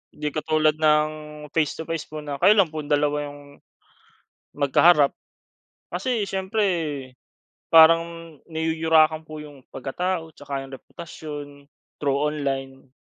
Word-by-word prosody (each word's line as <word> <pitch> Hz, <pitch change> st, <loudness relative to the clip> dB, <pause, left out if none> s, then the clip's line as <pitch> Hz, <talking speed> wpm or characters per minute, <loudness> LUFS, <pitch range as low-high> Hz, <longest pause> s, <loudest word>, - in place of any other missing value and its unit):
Hindi 150 Hz, -, -4 dB
katulad 155 Hz, 0 st, +2 dB
ng 150 Hz, -1 st, +4 dB, 0.4 s
face 155 Hz, -3 st, +1 dB
to -, -, -4 dB
face 165 Hz, -1 st, -4 dB
po 155 Hz, -, -8 dB
na, 145 Hz, -2 st, -5 dB
kayo 210 Hz, -, +7 dB
lang 185 Hz, -6 st, +4 dB
pong 155 Hz, -2 st, -6 dB
dalawa 145 Hz, 0 st, +1 dB
'yong, 145 Hz, 0 st, -14 dB, 1.0 s
magkaharap. 145 Hz, +1 st, +5 dB, 0.8 s
Kasi 220 Hz, +6 st, -1 dB
siyempre, 195 Hz, +2 st, -1 dB, 1.0 s
parang 165 Hz, 0 st, +5 dB
niyuyurakan 160 Hz, -1 st, +2 dB
po 155 Hz, -1 st, -8 dB
'yong 145 Hz, -3 st, -14 dB
pagkatao, 165 Hz, +5 st, -3 dB
tsaka 140 Hz, -2 st, -6 dB
'yong 135 Hz, -, -12 dB
reputasyon, 150 Hz, 0 st, -8 dB, 0.5 s
through 140 Hz, -2 st, +1 dB
online. 135 Hz, -3 st, -3 dB
155 Hz, 120 wpm, -24 LUFS, 145-165 Hz, 1.0 s, kayo